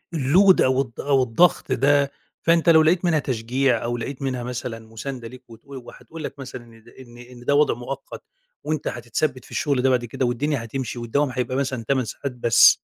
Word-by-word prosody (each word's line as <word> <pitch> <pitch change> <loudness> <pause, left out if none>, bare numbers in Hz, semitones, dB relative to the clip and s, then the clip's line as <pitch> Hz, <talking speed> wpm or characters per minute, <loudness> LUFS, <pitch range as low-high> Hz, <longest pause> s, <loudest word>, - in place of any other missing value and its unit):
الLoad 175 +7 +5
أو 130 +1 +2
الض 115 -4 -6
أو 135 -2 +2
الضغط 125 +9 +2
ده، 140 +1 +3 0.3
فأنت 165 +1 +3
لو 160 -1 +7
لقيت 170 +3 +2
منها 165 -3 +3
تشجيع 125 -1 0
أو 120 +1 -2
لقيت 130 +4 -6
منها 130 -2 -2
مثلًا 120 -1 -5
مساندة 115 +2 -7
ليك، 130 +2 -13
وتقو 115 +5 -13
وهتقول 160 +6 -11
لك 140 - -7
مثلًا 130 -2 -8
إن 115 -1 -18
د 120 - -17 0.4
إن 120 -1 -13
ده 145 - +2
وضع 150 +1 +4
مؤقت، 130 +3 -8 0.4
وأنت 155 -1 -2
هتتثبْت 125 +3 -2
في - - -18
الشغل 140 -3 0
ده 130 - +3
بعد 125 -2 +1
كده، 125 +3 -2
والدنيا 125 +2 -1
هتمشي 120 +1 -5
والدوام 140 +5 0
هيبقى 130 +1 -2
مثلًا 130 -3 -2
8 130 -3 +1
ساعات 135 +6 -5
بس. 120 -1 +5
130 Hz, 195 wpm, -23 LUFS, 120-145 Hz, 0.4 s, لو